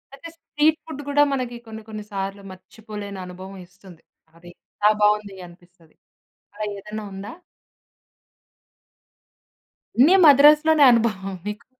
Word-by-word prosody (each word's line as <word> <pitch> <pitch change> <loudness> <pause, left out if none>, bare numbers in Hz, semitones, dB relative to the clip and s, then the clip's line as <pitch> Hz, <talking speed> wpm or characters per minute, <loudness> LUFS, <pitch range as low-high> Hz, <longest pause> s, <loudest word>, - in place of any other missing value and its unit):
అయితే, 305 +5 -11
street 305 0 0
food 310 -3 -8
గూడా 290 +1 +3
మనకి 250 -3 -4
కొన్ని 220 0 -9
కొన్ని 215 -1 -7
సార్లు 195 0 -5
మర్చిపోలేని 205 +1 -10
అనుభవం 185 +2 -11
ఇస్తుంది. 180 -1 -18 0.3
అది 170 +1 -15 0.2
ఎంత 210 +1 +2
బావుంది 210 -1 +1
అనిపిస్తది. 175 -2 -22 0.6
అలా 215 - -5
ఏదన్నా 210 +2 -8
ఉందా? 200 +3 -8 2.6
అన్నీ 295 +10 +5
మద్రాసులోనే 300 +2 +6
అనుభవమా 210 -5 -1
మీకు? 210 0 -7
210 Hz, 110 wpm, -22 LUFS, 195-265 Hz, 2.6 s, మద్రాసులోనే